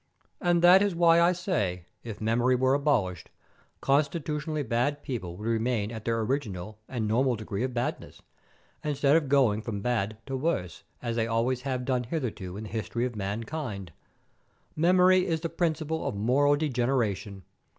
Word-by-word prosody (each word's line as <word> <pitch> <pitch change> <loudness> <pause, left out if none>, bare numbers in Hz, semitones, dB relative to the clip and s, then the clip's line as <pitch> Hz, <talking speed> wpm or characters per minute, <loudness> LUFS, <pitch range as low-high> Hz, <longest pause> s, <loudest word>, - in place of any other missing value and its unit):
And 175 -1 +2
that 180 +2 +8
is 200 -3 +1
why 170 0 +5
I 170 +1 +5
say, 105 - -2 0.2
if 110 -3 -7
memory 120 +3 +2
were 130 +1 +2
abolished, 125 - 0 0.5
constitutionally 150 +1 0
bad 125 +5 -1
people 90 -9 -5
would 105 - -6
remain 115 -2 0
at 110 -2 -7
their 115 -1 0
original 110 -5 -3
and 115 -4 -2
normal 125 +3 +2
degree 105 -1 -5
of 130 -1 -3
badness, 120 +1 -3 0.6
instead 145 -1 +2
of 155 -4 +2
going 125 -7 +3
from 105 -3 -4
bad 110 -2 -1
to 135 - -4
worse, 130 - -2 0.2
as 120 -1 -2
they 115 -1 +1
always 120 +2 0
have 130 -2 -3
done 125 -2 0
hitherto 115 - -4
in 110 - -6
the 110 - -8
history 115 +2 -2
of 125 -2 -4
mankind. 105 - -4 0.8
Memory 180 +3 +4
is 165 -3 -1
the 165 - -2
principle 160 -1 -1
of - - -3
moral 135 +8 +3
degeneration. 120 - -1
125 Hz, 160 wpm, -28 LUFS, 110-150 Hz, 0.8 s, that